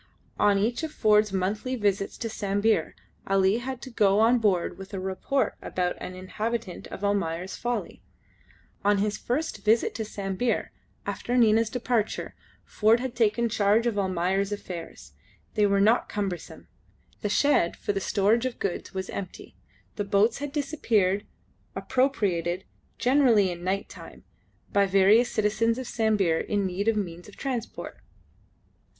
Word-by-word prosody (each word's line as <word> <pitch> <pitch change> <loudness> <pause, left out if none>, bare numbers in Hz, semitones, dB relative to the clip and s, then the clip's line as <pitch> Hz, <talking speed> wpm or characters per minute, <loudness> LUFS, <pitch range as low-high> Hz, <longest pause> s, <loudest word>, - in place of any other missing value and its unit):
On 205 -1 +4
each 225 +7 0
of 320 -1 -4
Ford's 210 -5 +3
monthly 200 +7 -1
visits 200 -4 -1
to 230 - -3
Sambir 205 -3 0 0.3
Ali 195 +2 +3
had 255 0 -6
to 260 - -8
go 205 -3 +3
on 235 +3 +5
board 195 -5 0
with 195 +1 -8
a - - -3
report 190 +9 -1
about 180 -1 -2
the - - -5
inhabitant 210 +2 -4
of 195 - -9
"Almayer's 190 -3 -1
Folly." 240 0 -3 0.8
On 205 0 +3
his 205 +1 -1
first 300 +7 -2
visit 225 +2 +3
to 220 - -3
Sambir, 205 +2 -2 0.3
after 245 +1 -2
Nina's 225 -1 +4
departure, 235 -2 -1 0.3
Ford 220 +2 +3
had 255 -1 -4
taken 235 +1 +2
charge 215 +1 +2
of 225 -4 0
Almayer's 190 +1 0
affairs. 180 -5 -7 0.4
They 210 -2 +3
were 200 0 +2
not 220 +4 +3
cumbersome. 195 -4 -5 0.5
The 210 - -1
shed 245 -8 +2
for 205 - -2
the 195 - -1
storage 220 +6 +2
of 255 - -7
goods 195 0 -4
was 190 0 -3
empty, 190 -3 -7 0.4
the 205 - 0
boats 205 +4 +2
had 290 0 -4
disappeared, 230 -10 0 0.5
appropriated 190 -10 0 0.3
generally 245 -7 +4
in 175 0 -7
night 190 +2 -1
time - - -12 0.5
by 200 -1 +4
various 200 +5 +5
citizens 220 +2 +1
of 260 - -4
Sambir 210 -8 +1
in 205 -1 -1
need 190 +3 -2
of 225 -1 +3
means 175 -3 -4
of 205 - -15
transport. 250 -4 -5
210 Hz, 150 wpm, -26 LUFS, 195-235 Hz, 0.8 s, on